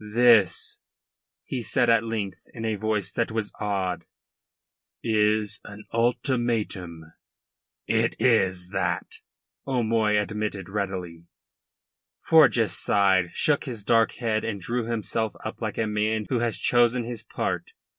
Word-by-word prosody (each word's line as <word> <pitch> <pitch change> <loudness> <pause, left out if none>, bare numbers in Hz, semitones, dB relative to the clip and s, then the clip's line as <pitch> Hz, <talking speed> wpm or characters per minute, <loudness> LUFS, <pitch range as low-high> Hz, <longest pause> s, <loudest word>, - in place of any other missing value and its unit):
"This," 115 0 +3 0.6
he 130 - -4
said 120 +1 +1
at 115 -1 +4
length 110 -4 -4
in 115 -1 -5
a 110 - 0
voice 105 -2 -1
that 115 +2 -1
was 110 -1 -3
awed, 95 -4 -2 1.0
"is 105 -1 +1
an 105 +1 -11
ultimatum." 115 - -1 0.7
"It 115 +1 +1
is 95 -7 +2
that," - - -2 0.5
O'Moy 110 -4 +2
admitted 105 -2 -3
readily. 90 -4 -4 1.0
Forjas - - +5
sighed, 95 -3 +2
shook 150 0 +2
his 120 -6 -5
dark 115 +1 +3
head 110 -3 -1
and 105 -3 -3
drew 120 +5 -2
himself 110 -1 -1
up - - -6
like - - -3
a 115 - +1
man 105 0 -1
who 125 - +1
has 120 -1 0
chosen 120 0 +3
his 115 -1 -5
part. - - -3
110 Hz, 125 wpm, -25 LUFS, 100-115 Hz, 1.0 s, Forjas